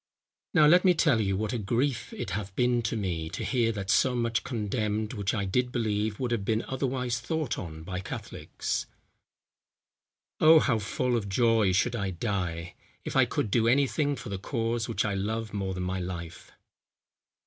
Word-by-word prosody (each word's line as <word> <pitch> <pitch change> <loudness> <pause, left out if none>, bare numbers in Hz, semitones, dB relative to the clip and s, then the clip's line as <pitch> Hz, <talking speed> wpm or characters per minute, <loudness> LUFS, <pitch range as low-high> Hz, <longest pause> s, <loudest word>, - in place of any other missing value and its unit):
"Now, 155 - +7
let 175 +4 +6
me 180 -2 +5
tell 140 -8 +3
you, 95 -2 0
what 110 +2 -2
a 120 - -1
grief 120 +4 -1
it - - -5
hath 100 0 -4
been 125 -1 +2
to 115 0 -2
me, 85 -6 -2
to - - -5
hear 120 -3 +1
that 100 -1 -2
so 125 +2 +3
much 115 -1 0
condemned, 110 -2 -2
which 100 -4 -1
I 100 -2 -1
did 125 +6 0
believe 110 -3 -1
would 125 -2 -1
have 115 -4 0
been 110 +2 0
otherwise 125 -3 -1
thought 155 0 -2
on 80 -3 -7
by 90 +1 -4
Catholics." 95 - -4 1.5
"Oh! 160 +1 +8
how 125 -7 +3
full 125 +4 -1
of 105 -4 -2
joy 115 -1 +3
should 110 +6 +1
I 100 -4 -1
die, 90 -3 -3 0.3
if - - -4
I - - +6
could 105 - -2
do 115 +1 +3
any 140 +4 +4
thing 145 +1 0
for 105 - -8
the 100 -1 -4
cause 115 +2 -2
which 105 - 0
I 105 - 0
love 110 +3 -3
more 95 -2 -2
than 90 - -3
my 95 +1 -2
life." 90 -1 -7
110 Hz, 190 wpm, -28 LUFS, 95-125 Hz, 1.5 s, Oh